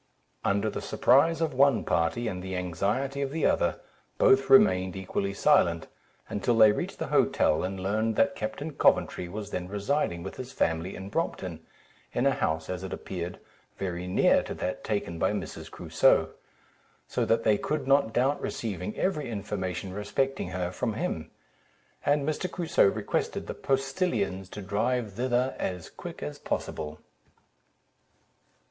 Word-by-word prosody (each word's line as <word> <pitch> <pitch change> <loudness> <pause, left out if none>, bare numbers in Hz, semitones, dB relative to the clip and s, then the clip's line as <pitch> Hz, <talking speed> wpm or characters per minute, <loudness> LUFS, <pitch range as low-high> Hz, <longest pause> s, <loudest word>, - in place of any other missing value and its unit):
Under 100 +2 +1
the 105 - -3
surprise 165 +5 +3
of 160 -3 0
one 135 -1 +4
party, 85 +9 0
and 90 -4 -3
the 95 0 -5
anxiety 100 - -1
of 140 - -1
the 155 +2 -1
other, - - +2 0.4
both 135 0 +4
remained 95 -8 +5
equally 95 +1 -2
silent, 85 -4 +3 0.4
until 115 +3 0
they 110 -2 +8
reached - - -3
the - - -3
hotel, 75 - +3
and 95 +1 -3
learnt 110 +4 0
that 185 - +3
Captain 140 +5 -4
Coventry 90 -8 +2
was 105 +2 -6
then 90 -1 -3
residing 100 - -1
with 95 - -7
his 130 0 -6
family 80 -1 -1
in 95 +1 -7
Brompton, 95 - -3 0.5
in 120 - +1
a 140 - +5
house, 80 -9 -1
as 90 0 -4
it 95 - -5
appeared, 90 -1 -5 0.4
very 90 -2 -3
near 90 - +4
to - - -6
that 90 - -3
taken 100 -6 -2
by - - +2
Mrs. - - -5
Crusoe; - - +3 0.8
so - - -1
that 115 0 +2
they 105 -2 +3
could 150 -3 -2
not 135 -4 +4
doubt 130 +5 +1
receiving 105 -3 -4
every 155 -8 -1
information 95 -3 -4
respecting 105 +5 -1
her 90 -1 -2
from 115 +4 -2
him; 80 -7 -3 0.7
and 145 0 +2
Mr. 155 +4 -1
Crusoe 170 - +3
requested 105 +1 -1
the - - -5
postillions 135 - -1
to 105 - -7
drive 110 +2 -1
thither 125 +3 0
as 90 -3 -4
quick - - -8
as 75 - -5
possible. 75 -1 -4
105 Hz, 155 wpm, -28 LUFS, 90-135 Hz, 0.8 s, they